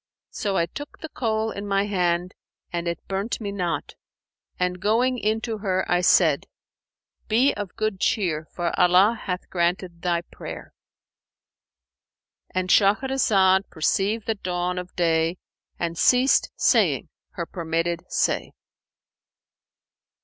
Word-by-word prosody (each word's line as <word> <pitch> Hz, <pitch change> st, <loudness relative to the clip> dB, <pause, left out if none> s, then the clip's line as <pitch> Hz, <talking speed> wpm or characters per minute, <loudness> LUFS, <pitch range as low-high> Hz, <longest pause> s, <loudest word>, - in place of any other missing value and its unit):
So 200 Hz, -2 st, -2 dB
I 170 Hz, -, +2 dB
took 290 Hz, +11 st, -9 dB
the 315 Hz, -, -8 dB
coal 220 Hz, -4 st, -1 dB
in 200 Hz, +1 st, -6 dB
my 195 Hz, 0 st, +1 dB
hand, 180 Hz, -3 st, 0 dB, 0.4 s
and 170 Hz, 0 st, -2 dB
it 170 Hz, -, -4 dB
burnt 195 Hz, +4 st, -2 dB
me 205 Hz, -3 st, -4 dB
not; 180 Hz, -4 st, -3 dB, 0.7 s
and 180 Hz, 0 st, 0 dB
going 240 Hz, +5 st, +2 dB
in 220 Hz, +1 st, 0 dB
to 225 Hz, -2 st, -4 dB
her, 190 Hz, -2 st, 0 dB
I 175 Hz, 0 st, +2 dB
said, 165 Hz, -5 st, +4 dB, 0.8 s
'Be 245 Hz, +6 st, +3 dB
of 205 Hz, -3 st, -6 dB
good 215 Hz, -3 st, -2 dB
cheer, 160 Hz, -8 st, 0 dB
for 175 Hz, -1 st, -2 dB
Allah 180 Hz, +4 st, +5 dB
hath 180 Hz, -1 st, -3 dB
granted 175 Hz, 0 st, -1 dB
thy 170 Hz, -1 st, 0 dB
prayer!'"—And 185 Hz, +1 st, -11 dB
Shahrazad 200 Hz, -3 st, +3 dB
perceived 200 Hz, +7 st, 0 dB
the 225 Hz, -, +1 dB
dawn 180 Hz, -2 st, -2 dB
of 180 Hz, 0 st, -9 dB
day 165 Hz, 0 st, +1 dB, 0.4 s
and 170 Hz, -1 st, -2 dB
ceased 250 Hz, +9 st, +4 dB
saying -, -, +2 dB, 0.2 s
her -, -, -4 dB
permitted 165 Hz, 0 st, -2 dB
say. -, -, 0 dB
190 Hz, 125 wpm, -24 LUFS, 175-215 Hz, 0.8 s, Allah